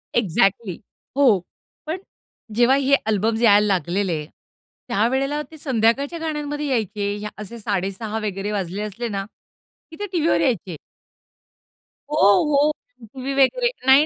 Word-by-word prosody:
Exactly. 195 -2 +1 0.4
हो. 240 -9 +5 0.5
पण 325 +4 -2 0.6
जेव्हा 245 +3 +5
हे 280 0 +4
अल्बम्स 220 +1 +1
यायला 210 -2 +6
लागलेले, 180 -3 0 0.6
त्यावेळेला 265 +6 +1
ते 315 - -11
संध्याकाळच्या 270 +4 +1
गाण्यांमध्ये 300 -2 -3
यायचे 210 -4 -2
असे 210 +3 -8
06:30 200 +1 -2
वगैरे 195 +1 -3
वाजले 195 -1 -3
असले 215 +3 -4
ना, 195 -1 -3 0.7
की - - -9
ते 410 - -2
टीव्हीवर 320 - +2
यायचे. 185 -6 0 1.4
हो, 300 - 0
हो. 285 +8 +4 0.4
टीव्ही 265 +1 -4
वगैरे. 275 - +3 0.2
नाही, 270 +3 +7
225 Hz, 120 wpm, -22 LUFS, 200-280 Hz, 1.4 s, नाही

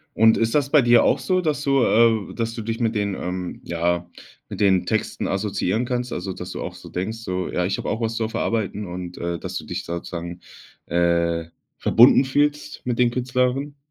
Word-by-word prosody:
Und 110 +1 +5
ist 115 +4 +1
das 140 -1 +1
bei 150 - +6
dir 120 -1 +5
auch - - +3
so, 185 -1 +1
dass 150 -3 -1
du, 135 -3 +3
äh 115 -2 +3
dass 115 -1 -2
du 115 - -4
dich 115 +2 -3
mit 115 -1 0
den, 100 -2 -1
ähm, 90 0 -5
ja 85 +1 -1 0.4
mit - - -7
den 95 -2 +3
Texten - - -1
assoziieren 100 +2 -1
kannst? 125 0 -2
Also, 95 +1 -4
dass - - -7
du - - -6
auch - - -5
so - - -12
denkst 105 +5 -4
so: 90 -5 -3
„Ja, 90 - 0
ich 95 - -1
habe - - -4
auch 110 - -2
was 115 0 -1
zu 110 -1 -1
verarbeiten“ 105 -2 -2
und 90 0 -7
dass 85 0 -4
du - - -7
dich - - -5
sozusagen, 85 0 -5 0.5
äh, 85 -1 +1 0.3
verbunden 125 +4 +6
fühlst 145 +2 0
mit 120 -2 -1
den 120 -1 +4
Künstlern? 125 +3 -1
110 Hz, 205 wpm, -23 LUFS, 90-125 Hz, 0.5 s, bei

